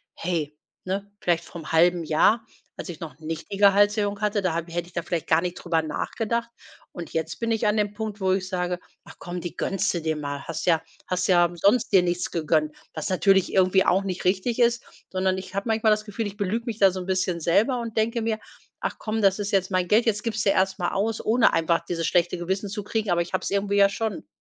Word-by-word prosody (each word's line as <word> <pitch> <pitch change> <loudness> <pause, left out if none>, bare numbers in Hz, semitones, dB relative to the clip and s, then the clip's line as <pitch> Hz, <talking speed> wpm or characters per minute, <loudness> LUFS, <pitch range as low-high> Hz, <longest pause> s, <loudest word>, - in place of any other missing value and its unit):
„Hey“, 155 -4 -3 0.3
ne? 195 +2 -3
Vielleicht 170 -1 +1
vorm 160 -3 -9
halben 175 +1 +4
Jahr, 185 +9 +3 0.3
als - - -6
ich 170 - -7
noch 155 -4 -8
nicht 160 +4 -6
die 200 - -3
Gehaltserhöhung 205 +1 +3
hatte, 210 0 +1
da 185 - +1
hab 170 +1 -3
hätte 175 0 -2
ich 180 - -18
da 170 - -1
vielleicht 165 -1 -3
gar 160 0 +4
nicht 180 0 -3
drüber 165 -2 0
nachgedacht 230 +9 -2 0.4
und 175 -2 -8
jetzt 160 0 -3
bin 230 0 -1
ich 225 0 0
an 210 - +2
dem 210 -1 +1
Punkt, 215 -1 -5
wo 190 0 +2
ich 185 -1 0
sage: 180 -1 -2 0.2
„Ach, - - -14
komm, 175 0 -6
die 175 - -7
gönnste 195 -2 0
dir 160 0 -1
mal. 145 -2 -5
Hast 160 -1 -4
ja 165 -2 +4 0.3
hast 180 0 0
ja 175 -2 +5
sonst 200 +7 +2
dir 190 -2 +6
nichts 175 0 -1
gegönnt“, 155 -2 +1 0.2
was 155 - -4
natürlich 190 +1 +3
irgendwie 190 0 +4
auch 190 +2 +3
nicht 190 -1 -4
richtig 195 +6 +1
ist, 235 0 +3 0.3
sondern 190 0 0
ich 185 0 -10
habe 200 +3 -2
manchmal 220 0 +2
das 215 0 +1
Gefühl, 210 +1 -3
ich 205 +1 -9
belüge 215 +4 -1
mich 225 - -3
da 195 -1 +6
so 185 0 -5
'n 180 - -7
bisschen 185 -2 0
selber 225 - +2
und 230 -1 -7
denke 230 +2 +1
mir: 220 -1 -1 0.4
„Ach - - -3
komm, 220 0 -2
das 195 +1 +4
ist 205 0 -2
jetzt 195 -1 +1
mein 185 -1 +1
Geld, 220 +5 +4
jetzt 210 -2 0
gibste 220 -3 0
erst 190 0 +1
mal 175 -3 -1
aus“, 215 +3 -1
ohne 230 +2 +4
einfach 165 0 +1
dieses 165 -2 -1
schlechte 175 0 +2
Gewissen 190 +4 -2
zu 205 +1 -5
kriegen, 220 0 -2
aber 175 -1 +2
ich 175 - -13
hab's 185 - -1
irgendwie 200 0 0
ja 200 0 +6
schon. 210 - -4
190 Hz, 235 wpm, -25 LUFS, 175-210 Hz, 0.4 s, dir